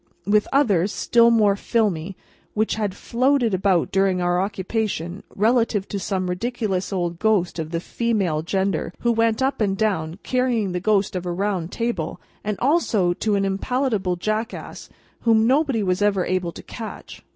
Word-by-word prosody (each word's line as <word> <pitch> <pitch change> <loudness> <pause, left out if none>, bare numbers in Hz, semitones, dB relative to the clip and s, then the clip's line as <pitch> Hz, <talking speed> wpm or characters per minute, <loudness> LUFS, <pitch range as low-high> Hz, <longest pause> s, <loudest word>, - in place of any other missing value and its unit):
with 210 +1 +3
others, 205 - +3
still 235 +1 +4
more 215 -4 +4
filmy, 195 -5 -1 0.4
which 215 +1 +1
had 210 -3 -2
floated 250 -1 +1
about 185 -2 +2
during 195 -1 +2
our 175 0 +1
occupation, 195 -2 -3
relative 225 -2 +2
to 200 - -3
some 185 -1 -2
ridiculous 195 0 -2
old 175 -3 -2
ghost 205 -6 +1
of 155 -1 -3
the 165 0 -2
female 195 -6 -1
gender 190 -1 -1
who 235 - +2
went 230 +1 +2
up 265 -3 0
and 195 -2 +1
down, 180 -6 -1
carrying 250 -6 0
the 180 - -2
ghost 200 0 +1
of 180 - -2
a - - -1
round 185 -2 -2
table; 230 -9 -3 0.2
and 210 -1 -2
also 235 - +2
to 210 +3 0
an 195 0 +1
impalpable 200 -1 0
Jackass, 215 +6 -4 0.3
whom 225 -1 +3
nobody 265 -3 +2
was 185 0 0
ever 200 -3 +2
able 180 -2 -1
to - - -11
catch. 225 -2 -8
200 Hz, 160 wpm, -23 LUFS, 180-230 Hz, 0.4 s, still